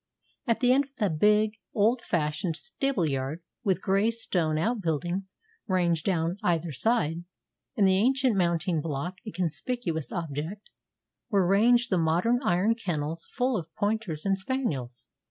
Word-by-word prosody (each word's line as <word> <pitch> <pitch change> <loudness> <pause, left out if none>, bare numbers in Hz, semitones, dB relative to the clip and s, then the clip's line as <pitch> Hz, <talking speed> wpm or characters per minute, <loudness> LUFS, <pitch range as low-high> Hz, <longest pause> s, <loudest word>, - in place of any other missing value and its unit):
At 230 - +1
the 250 0 +5
end 280 +2 +3
of - - -25
the 205 -6 +1
big, 210 +6 +3 0.2
old 225 +4 +3
fashioned 160 0 -1
stable 270 - -1
yard, 135 +4 -3 0.2
with 190 -4 0
grey 195 +3 +3
stone 175 -9 0
outbuildings 185 - -1 0.3
ranged 175 -4 +1
down 175 -1 0
either 170 -1 0
side, 165 - 0 0.5
and 200 -3 +5
the 190 0 +4
ancient 260 +1 +3
mounting 170 -2 +1
block 165 +5 -4
a - - -3
conspicuous 175 - -3
object, 165 +4 -5 0.6
were 200 -5 +3
ranged 235 +6 +4
the 185 - +3
modern 175 +10 +2
iron 195 0 +2
kennels 165 -7 -3
full 255 -1 0
of 165 -5 -4
pointers 205 -7 -2
and 195 0 +1
spaniels. 140 - -3
185 Hz, 145 wpm, -27 LUFS, 165-220 Hz, 0.6 s, the